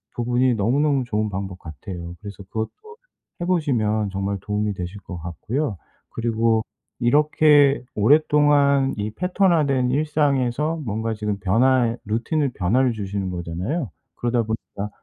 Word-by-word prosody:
부분이 120 +1 +1
너무너무 135 +5 +1
좋은 110 -2 -1
방법 95 -1 -5
같아요. 85 +3 -8
그래서 100 -1 -9
그것도 110 +3 -4 0.7
해 - - -1
보시면 115 - +1
정말 100 +1 -2
도움이 105 0 -1
되실 90 +2 -6
것 90 -1 -8
같고요. 100 - -3 0.3
그리고 115 -1 +1 0.4
이렇게 145 +1 +4
오랫동안 140 +2 +4
이 105 +1 -3
패턴화된 155 - +2
일상에서 150 0 +1
뭔가 110 +1 -2
지금 105 -2 -3
변화의 120 +4 +2
루틴을 125 +7 0
변화를 120 +7 +2
주시는 100 -2 -3
거잖아요. 90 - -3 0.2
그러다 120 0 0
보니까 105 -2 -5
115 Hz, 320 characters per minute, -22 LUFS, 100-140 Hz, 0.7 s, 이렇게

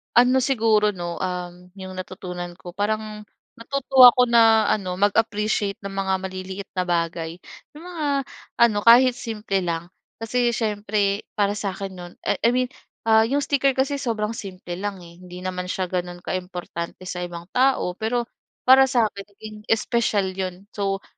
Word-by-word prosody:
Ano 250 +2 +5
siguro 225 -5 +2
'no, 175 -1 -5
um, 180 -1 -5
yung 190 -1 -8
natutunan 180 -1 -7
ko. 175 0 -10
Parang, 210 +2 -3 0.3
natutuwa 260 0 +6
ako 250 - +5
na 225 -2 +6
ano 185 -4 0
mag-appreciate 210 0 +1
ng 200 - -5
mga 195 0 -1
maliliit 190 +1 -6
na 185 - +1
bagay. 170 -1 -1 0.4
Yung 310 - -11
mga 345 -4 -4 0.5
ano, 235 -3 +5
kahit 245 +2 +7
simple 215 -5 -3
lang. 170 -1 -3 0.2
Kasi, 240 +1 0
siyempre 205 -2 -1
para 205 -2 +2
sa 200 -3 -3
akin 195 0 -5
no'n 175 0 -9
I - - 0
I - - +5
mean, 255 0 0 0.3
ah, 220 0 +4
yung 285 +4 0
sticker 275 -1 +2
kasi 275 +2 0
sobrang 225 -5 -2
simple 185 -4 -7
lang 200 -2 -4
eh, 170 0 -15
hindi 180 0 -10
naman 180 -1 -4
siya 185 0 -2
gano'n 175 -1 -4
ka-importante 180 -1 -5
sa 180 -1 -5
ibang 175 -1 -6
tao. 260 -7 +2
Pero, 240 +2 0 0.4
para 265 +1 +7
sa 240 -4 +3
akin 200 - -8
naging 215 +1 -10 0.2
special 220 -4 0
yun. 185 0 -5
So, 195 -1 -2
205 Hz, 160 wpm, -23 LUFS, 185-230 Hz, 0.5 s, kahit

